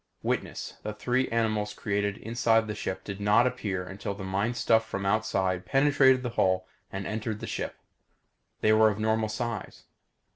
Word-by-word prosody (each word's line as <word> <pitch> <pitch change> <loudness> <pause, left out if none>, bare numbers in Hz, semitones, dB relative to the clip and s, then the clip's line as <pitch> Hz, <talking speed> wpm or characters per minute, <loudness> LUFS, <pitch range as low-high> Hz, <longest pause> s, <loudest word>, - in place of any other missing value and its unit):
Witness: - - -3
The 105 - -4
three 125 +4 0
animals 110 -2 0
created 100 -1 -1
inside 115 0 +2
the 105 - -4
ship 95 -2 -4
did 100 0 -6
not 105 +4 +5
appear 100 -8 -2
until 100 +2 -5
the 100 - -7
mind 100 +5 -1
stuff 115 -2 +3
from 100 -3 -4
outside 95 -3 +1
penetrated 135 -2 +4
the 125 - -1
hull 95 -4 +1 0.2
and 95 0 -4
entered 110 0 -3
the - - -5
ship. - - -4 0.9
They 110 - +4
were 110 0 +6
of 105 - -3
normal 110 0 +1
size. 115 -1 -4
110 Hz, 170 wpm, -28 LUFS, 100-115 Hz, 0.9 s, were